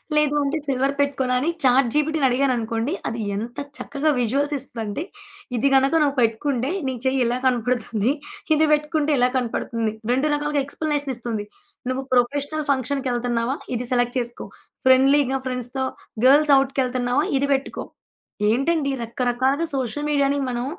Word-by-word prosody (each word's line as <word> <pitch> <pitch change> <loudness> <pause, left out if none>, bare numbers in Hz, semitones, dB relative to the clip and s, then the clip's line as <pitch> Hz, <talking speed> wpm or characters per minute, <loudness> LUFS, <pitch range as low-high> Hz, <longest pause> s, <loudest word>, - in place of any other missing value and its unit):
లేదు 300 -1 +2
అంటే 280 +3 -1
సిల్వర్ 270 +1 +1
పెట్టుకోనా? 270 -3 0
అని 315 - 0
చాట్ 255 -1 +4
జి‌పి‌టి‌ని 300 -2 +2
అడిగాననుకోండి, 245 0 0 0.2
అది 230 0 -4
ఎంత 230 +4 -5 0.2
చక్కగా 295 +2 -1
విజువల్స్ 275 +5 0
ఇస్తుందంటే, 230 +1 -3 0.5
ఇది 275 +5 +2
గనక 270 +3 +3
నువ్వు 280 -1 0
పెట్టుకుంటే, 250 +4 0 0.2
నీ 260 - -3
చెయ్యి 260 0 +2
ఇలా 245 +1 -1
కనపడుతుంది, 245 -1 0 0.4
ఇది 310 +1 +3
పెట్టుకుంటే 300 0 +1
ఇలా 250 0 +4
కనపడుతుంది. 230 -2 -2 0.2
2 265 +4 +1
రకాలుగా 295 -1 0
ఎక్స్‌ప్లనేషన్ 290 -2 -2
ఇస్తుంది. 230 -3 -4 0.4
నువ్వు 260 +1 -2
ప్రొఫెషనల్ 285 +5 +1
ఫంక్షన్‌కెళ్తన్నావా? 250 -1 -1 0.2
ఇది 240 +1 -2
సెలెక్ట్ 245 +1 +1
చేసుకో, 240 0 -7 0.4
ఫ్రెండ్‌లీగా 270 +1 +4
ఫ్రెండ్స్‌తో, 255 +1 -3 0.4
గర్ల్స్ 290 +2 +6
ఔట్‌కెళ్తన్నావా? 255 0 0
ఇది 280 0 0
బెట్టుకో. 270 - -5 0.7
ఏంటండీ, 280 +4 +1
రకరకాలుగా 250 +6 0
సోషల్ 270 +3 -2
మీడియా‌ని 280 -1 +2
మనం 240 0 -2
265 Hz, 135 wpm, -23 LUFS, 245-285 Hz, 0.7 s, గర్ల్స్